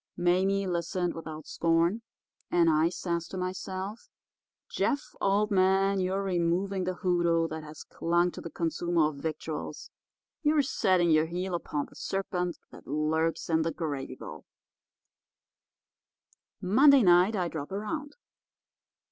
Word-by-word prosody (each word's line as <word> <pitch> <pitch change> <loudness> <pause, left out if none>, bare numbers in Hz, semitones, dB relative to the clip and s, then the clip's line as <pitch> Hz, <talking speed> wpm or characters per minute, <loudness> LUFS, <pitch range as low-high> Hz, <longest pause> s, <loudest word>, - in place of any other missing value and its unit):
Mame 190 +3 +2
listened 175 0 -1
without 155 -2 -8
scorn, 170 +6 +1 0.5
and 170 -2 +4
I 155 +2 +3
says 170 -2 -3
to 190 - -7
myself, 185 +3 -5 0.6
'Jeff, 285 -1 -1
old 205 +2 +2
man, 195 +1 +3
you're 190 +2 0
removing 185 +1 0
the 185 0 -2
hoodoo 170 -3 +1
that 160 0 -6
has 150 0 -10
clung 175 +1 0
to - - -9
the 170 - -7
consumer 165 -1 0
of 150 - -10
victuals; 155 +1 -5 0.5
you're 300 -2 +3
setting 185 -9 +2
your 155 0 +4
heel 180 +2 -3
upon 150 -4 -2
the - - -19
serpent 180 -2 -2
that - - -14
lurks 155 +3 0
in 160 -1 +2
the 165 +1 0
gravy 145 -5 -4
bowl.' - - -10 2.1
"Monday 265 +7 +6
night 180 +3 +5
I 180 -3 0
drop 155 -2 -6
around. 215 +9 -4
175 Hz, 130 wpm, -29 LUFS, 165-195 Hz, 2.1 s, Monday